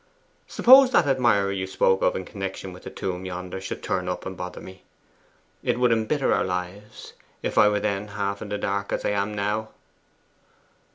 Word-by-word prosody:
Suppose 260 +1 +7
that - - +5
admirer 120 -8 +2
you 95 -1 -3
spoke 95 0 +2
of - - +2
in 95 - -4
connection 95 -1 -6
with 90 - -12
the - - -8
tomb 90 -1 -4
yonder 90 0 -6
should 95 - -6
turn 90 -1 -2
up, 90 - -4
and 95 - -5
bother 90 0 -7
me. 95 0 -12 0.8
It - - -1
would 125 -1 +3
embitter 115 +5 +1
our - - +2
lives, 90 +3 -6 0.3
if - - -2
I 105 - +6
were 105 0 0
then 100 0 -2
half 100 -1 -3
in 105 - -6
the 105 - -2
dark, 100 0 -2
as - - -2
I - - +1
am 105 +1 -1
now! 105 +2 -2
100 Hz, 190 wpm, -24 LUFS, 95-105 Hz, 0.8 s, Suppose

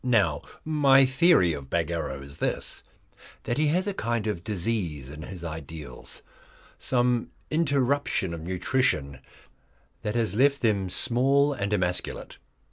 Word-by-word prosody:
Now 100 - +2 0.2
my 140 -3 +5
theory 130 - +4
of 70 -3 -7
Bagarrow 80 -5 -2
is 70 +1 -10
this, - - -2 0.6
that 120 - -2
he 155 - +3
has 180 +5 +1
a 205 - -2
kind 115 - -2
of 105 -6 -3
disease 90 - -2
in 75 +1 -9
his 90 +1 -8
ideals, 80 -1 -8 0.6
some 125 -2 +1 0.2
interruption 140 - +1
of 85 - -6
nutrition 90 - 0 0.8
that 105 +2 -3
has 115 -5 0
left 140 +5 +3
them 100 -5 +1
small 135 +8 +4
and 100 -6 -3
emasculate. 90 -3 -2
105 Hz, 130 wpm, -26 LUFS, 85-135 Hz, 0.8 s, my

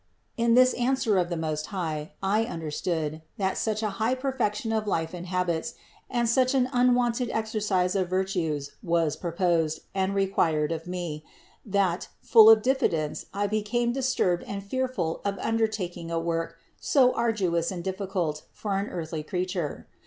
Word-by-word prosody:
2. 235 - +1
In 230 - +4
this 255 0 +6
answer 245 -5 +1
of 175 -1 0
the 170 - -2
Most 155 -1 -2
High 160 -5 -4
I 210 +4 +2
understood, 160 -4 -3 0.2
that 190 -1 0
such 215 0 -1
a 210 - 0
high 235 +4 +2
perfection 245 -5 -1
of 215 -1 -1
life 165 -4 -1
and 180 0 -6
habits 180 +3 -1 0.3
and 240 -1 +1
such 255 +3 +3
an 255 -1 +3
unwonted 245 -1 +2
exercise 210 -5 0
of 185 -2 0
virtues 175 -7 -1
was 170 -6 +1
proposed 170 -2 0
and 190 0 0
required 165 -6 +1
of 165 +1 -4
me, 175 -4 -4 0.4
that, 195 -4 0
full 225 -2 +7
of 220 -1 +7
diffidence, 170 - 0
I 205 +1 -1
became 215 +3 0
disturbed 245 -9 +1
and 200 -1 -5
fearful 255 -7 -2
of 200 -1 -1
undertaking 215 -7 -1
a 165 - -1
work 165 0 -2 0.2
so 270 -8 +4
arduous 190 -8 0
and 180 -3 -5
difficult 185 -5 -2
for 200 -2 -3
an 200 - -2
earthly 160 -2 -4
creature. 180 -1 -3
190 Hz, 160 wpm, -27 LUFS, 170-225 Hz, 0.4 s, full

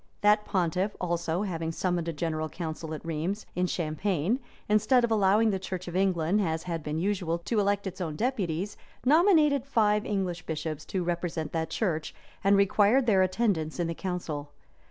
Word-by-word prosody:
That 210 +1 +4
pontiff, 185 +2 0
also, 170 +1 -1
having 165 -5 -2
summoned 175 0 -1
a - - 0
general 155 0 -2
council 160 -1 -5
at 155 - -10
Rheims, 165 +6 -2
in 180 0 +1
Champagne, 175 - -1 0.3
instead 215 +4 +4
of 235 - +1
allowing 215 +1 +4
the 190 - -1
church 185 -1 -5
of 175 - -6
England, 185 0 +2
as 160 -3 -1
had 170 -2 -3
been 150 +1 -3
usual, 180 -2 0
to 210 +6 -1
elect 200 0 +1
its 190 0 -5
own 160 -4 -3
deputies, 200 - -2 0.3
nominated 305 - +5
five 210 -6 +2
English 190 -6 -2
bishops 155 -1 -4
to 185 -2 -2
represent 170 -2 -2
that 160 -1 -2
church, 160 -8 -2 0.3
and 200 +1 +5
required 210 +6 +4
their 200 -5 +4
attendance 185 -5 0
in 175 - +1
the 165 - -2
council. 165 -5 -4
185 Hz, 175 wpm, -28 LUFS, 165-210 Hz, 0.3 s, nominated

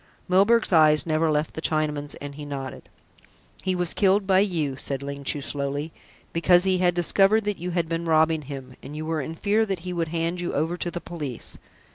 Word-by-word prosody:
Milburgh's 200 +4 +3
eyes 155 -2 +6
never 160 0 +1
left 150 0 0
the 160 - -6
Chinaman's, 150 -2 0
and 145 0 -8
he 150 +1 -8
nodded. 140 -2 -7 0.7
"He 185 -1 0
was 175 -2 -1
killed 195 0 +3
by 190 -1 +4
you," 165 -9 0
said 135 0 -3
Ling 140 0 -6
Chu 145 +1 -2
slowly, 145 +2 -3 0.4
"because 175 +1 +4
he 190 -1 +2
had 175 -1 +2
discovered 195 +5 +3
that 210 -1 -2
you 180 +2 -4
had 170 -2 -1
been 165 +1 -3
robbing 160 -1 +3
him, 135 -2 -8
and 150 - -9
you 155 +1 -5
were 160 -1 -1
in 160 +4 -6
fear 210 +5 +2
that 195 -5 -3
he 180 - -3
would 170 -2 -1
hand 170 +2 -2
you 175 - -3
over 160 +4 0
to 175 - -3
the 175 0 -5
police." 150 -8 -5
165 Hz, 210 wpm, -25 LUFS, 150-180 Hz, 0.7 s, eyes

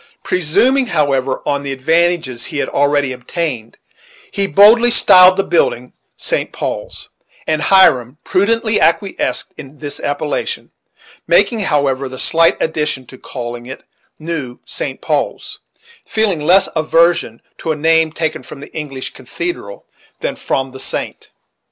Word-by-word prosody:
Presuming, 245 - +2
however, 135 -6 0
on 140 -1 -1
the 140 -1 -5
advantages 160 -2 0
he - - -6
had - - -1
already 145 -1 +1
obtained, 125 -3 -5 0.5
he 200 0 0
boldly 220 +5 +6
styled 185 -5 +7
the 195 - +2
building 125 -9 0 0.2
St. - - -2
Paul's, - - -5 0.4
and 155 -1 -1
Hiram 140 -10 +4
prudently 215 +3 +1
acquiesced 165 - 0
in 145 -1 -11
this 145 -1 -7
appellation, 150 - -3 0.6
making, 250 - +3
however, 140 -7 0
the 130 - -8
slight 165 +5 +4
addition 150 -4 -2
of 130 - -14
calling 120 -1 -7
it 130 - -9 0.3
"New 155 -6 -5
St. - - -4
Paul's," - - -3 0.5
feeling 215 -6 0
less 180 +6 +4
aversion 165 -6 +1 0.2
to 160 - -2
a - - -1
name 160 +1 +2
taken 160 0 -3
from 140 - -11
the 145 - -12
English 135 -4 -6
cathedral 130 -5 -6 0.3
than - - -3
from 135 0 -3
the 130 - -10
saint. - - -4
155 Hz, 135 wpm, -16 LUFS, 135-175 Hz, 0.6 s, styled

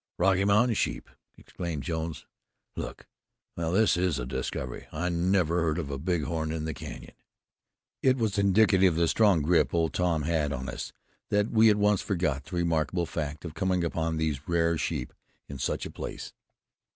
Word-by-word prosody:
"Rocky 95 +1 +3
Mountain 105 +4 +4
sheep!" - - -2 0.3
exclaimed 85 -6 -5
Jones. 80 +1 -4 0.5
"Look! - - -6 0.5
Well, 85 -1 -2
this 110 +4 +4
is 90 -4 +1
a - - -3
discovery. 65 -1 -4
I 85 +3 -2
never 90 -1 +1
heard 80 -2 0
of 75 -5 -3
a 70 - -4
bighorn 80 -1 -1
in 80 -1 -3
the 80 - -2
Canyon." 70 -5 -9 0.9
It 130 -1 +3
was 110 -4 0
indicative 95 -2 +4
of - - 0
the 85 - +3
strong 100 -5 +4
grip 85 +2 +2
Old 80 -1 +1
Tom 85 -4 +1
had 75 -2 0
on 65 -1 -4
us - - -5 0.4
that 105 +1 +1
we 110 0 +6
at 105 - +5
once 105 -1 +3
forgot 85 -8 -1
the - - -7
remarkable 85 0 0
fact 75 -1 -5
of 80 - -6
coming 90 +1 0
upon 80 -1 -1
those 80 -4 0
rare 85 -1 +2
sheep - - -3 0.3
in 70 -2 -8
such - - -2
a - - -6
place. - - -7
85 Hz, 175 wpm, -28 LUFS, 80-95 Hz, 0.9 s, we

